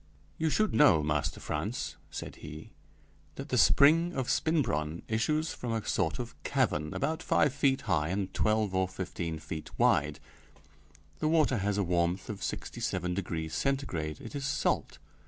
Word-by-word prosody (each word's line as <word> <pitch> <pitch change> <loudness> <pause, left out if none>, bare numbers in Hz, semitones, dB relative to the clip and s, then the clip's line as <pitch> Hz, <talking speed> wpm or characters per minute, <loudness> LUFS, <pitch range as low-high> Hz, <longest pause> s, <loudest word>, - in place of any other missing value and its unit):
You 160 0 +2
should 215 +7 +1
know, 110 - +6
Master 75 -1 -1
Frantz - - -3
(said - - -7
he), - - -9 0.6
that - - -7
the - - 0
spring 165 +5 +5
of 130 -2 -1
Spinbronn 85 - 0
issues 150 +9 0
from 120 -2 -4
a 110 -2 -3
sort 85 -3 0
of 120 -1 -5
cavern, 90 - 0
about 155 +4 -1
five 145 -3 +2
feet 140 -1 +2
high 85 -8 +1
and 95 +1 -2
twelve 110 -2 +1
or 95 0 +2
fifteen 90 -3 -4
feet 80 0 -7
wide; - - +3 1.0
the 155 - +1
water 155 -5 +3
has 100 +1 0
a 100 - +2
warmth 85 +1 0
of 100 - -8
sixty - - -4
seven 90 -1 -1
degrees 85 -4 -3
Centigrade; 90 - -1
it - - -9
is 140 -1 -3
salt. - - 0
105 Hz, 160 wpm, -30 LUFS, 85-140 Hz, 1.0 s, know